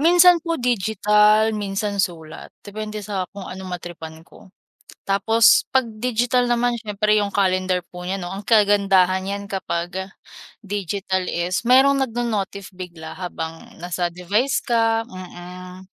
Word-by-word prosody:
Minsan 350 +2 +6
po 335 -1 -1
digital, 215 -1 +3
minsan 200 0 -2
sulat, 160 -4 -6
depende 215 +1 -6
sa 195 -3 -2
kung 200 -1 -8
ano 190 +1 -8
ma-tripan 165 -2 -8
ko. - - -17 0.6
Tapos, 215 +3 +4
'pag 260 -2 +3
digital 245 +1 +1
naman 240 0 +2
siyempre 210 -1 0
'yung 205 -1 0
calendar 185 -2 +1
po 180 0 -9
niya 190 +2 -2
'no 175 - -5
ang 195 +1 -6
kagandahan 195 -4 +4
niyan 200 +1 -4
kapag 190 0 -3 0.6
digital 195 -1 -2
is, 175 +2 -1
mayro'ng 270 +3 +5
nagno-notif 220 -6 -2
bigla 170 -3 -8
habang 165 -3 -7
nasa 175 0 -2
device 205 +10 0
ka, 225 -1 +2
mm. 180 0 -10
200 Hz, 130 wpm, -22 LUFS, 180-225 Hz, 0.6 s, Minsan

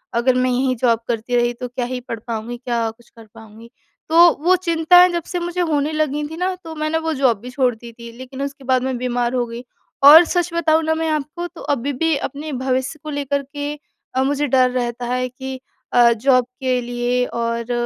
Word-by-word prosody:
अगर 250 +2 +2
मैं 255 0 +2
यही 255 +1 +1
जॉब 235 -3 +3
करती 235 +1 -2
रही 240 0 +2
तो 250 +1 -6
क्या 245 0 -4
ही 250 +1 -4
पढ़ 230 -2 -6
पाऊँगी, 230 +1 -4
क्या 235 -2 -2
कुछ 230 +1 -23
कर 225 -1 -14
पाऊँगी। 225 +1 -14 0.4
तो 340 +2 +7
वो 365 +2 +5
चिंताएँ 355 0 +5
जब 345 -1 -2
से 355 - -3
मुझे 350 +1 -3
होने 305 -3 0
लगी 300 -1 -1
थी 320 +2 -9
ना, 365 +2 -1
तो 330 -3 -10
मैंने 310 +1 -1
वो 320 0 -2
जॉब 260 -7 +2
भी 245 +4 -9
छोड़ 250 -1 +1
दी 235 +1 -12
थी 235 0 -11
लेकिन 260 +1 -8
उसके 280 0 -5
बाद 255 -1 +1
मैं 260 -1 -2
बीमार 245 0 -1
हो 250 -1 0
गई 235 +1 -8 0.4
और 305 +4 +10
सच 350 0 -1
बताऊँ 325 -1 +2
ना 320 0 +1
मैं 320 0 -1
आपको, 310 +3 -3
तो 345 -1 -13
अभी 285 0 -2
भी 320 +4 +1
अपने 285 +2 -5
भविष्य 260 +3 -2
को 310 - -6
लेकर 285 -1 -2
के 290 +1 -5 0.4
अ, 260 - +2
मुझे 285 +2 0
डर 255 -1 +3
रहता 245 -1 -3
है 250 +1 -1
कि 265 +1 -7 0.3
अ, 240 -1 +6
जॉब 255 +2 +2
के 255 -1 0
लिए 245 +1 -1
और 235 0 -3
260 Hz, 220 wpm, -20 LUFS, 240-310 Hz, 0.4 s, और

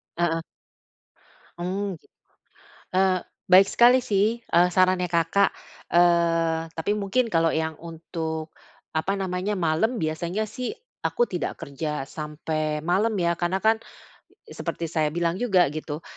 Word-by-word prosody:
Heeh. 165 -1 0 1.2
Oh, 190 +2 -3 1.0
eee, 185 -1 +3 0.3
baik 190 +2 +8
sekali 245 +4 +5
sih, 215 0 +1
eee, 180 -6 +3
sarannya 185 -1 +2
Kakak. 170 +4 +3 0.4
Eee, 165 -2 +3
tapi 165 +6 -1
mungkin 210 +4 0
kalau 165 -5 +2
yang 160 0 -1
untuk 160 -1 -5 0.4
apa 160 +5 0
namanya, 190 +2 -2
malam 175 +9 +1
biasanya 170 +7 -2
sih 250 +3 -4 0.3
aku 480 0 +1
tidak - - -4
kerja 140 0 -4
sampai 155 0 -3
malam 185 +8 +1
ya, 170 -1 +1
karena 175 +3 -1
kan 220 +2 +4 0.8
seperti 165 -2 -4
saya 155 -2 +1
bilang 170 +1 0
juga 195 -9 +3
gitu, 155 +1 -5
175 Hz, 120 wpm, -25 LUFS, 160-195 Hz, 1.2 s, baik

